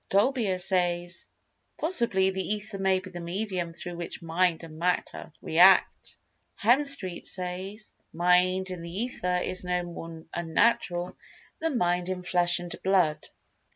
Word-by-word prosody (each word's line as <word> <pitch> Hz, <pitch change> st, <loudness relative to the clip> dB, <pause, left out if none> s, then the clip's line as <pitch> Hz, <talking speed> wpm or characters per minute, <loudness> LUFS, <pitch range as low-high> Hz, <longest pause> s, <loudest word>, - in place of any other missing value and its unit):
Dolbear 205 Hz, -2 st, +2 dB
says: 175 Hz, -1 st, -1 dB, 0.5 s
"Possibly 235 Hz, -, +3 dB
the 190 Hz, 0 st, -3 dB
Ether 210 Hz, 0 st, -4 dB
may 190 Hz, -1 st, +2 dB
be 185 Hz, 0 st, -11 dB
the 175 Hz, -, -7 dB
medium 180 Hz, 0 st, -3 dB
through 175 Hz, +1 st, -8 dB
which 170 Hz, -1 st, -6 dB
Mind 170 Hz, 0 st, 0 dB
and 160 Hz, -1 st, -10 dB
Matter 180 Hz, -1 st, -2 dB
react." 180 Hz, +4 st, +4 dB, 0.4 s
Hemstreet 240 Hz, -6 st, +2 dB
says: 190 Hz, +4 st, -5 dB, 0.2 s
"Mind 180 Hz, +2 st, +2 dB
in 180 Hz, -2 st, -6 dB
the 170 Hz, -, -7 dB
Ether 180 Hz, -2 st, -2 dB
is 185 Hz, 0 st, -3 dB
no 180 Hz, 0 st, -1 dB
more 165 Hz, -2 st, -8 dB
unnatural 175 Hz, +1 st, +1 dB, 0.4 s
than 320 Hz, -5 st, -1 dB
Mind 175 Hz, -2 st, 0 dB
in 185 Hz, -1 st, -4 dB
flesh 175 Hz, -1 st, +3 dB
and 175 Hz, 0 st, -5 dB
blood." 185 Hz, -5 st, +1 dB
180 Hz, 135 wpm, -27 LUFS, 175-195 Hz, 0.5 s, react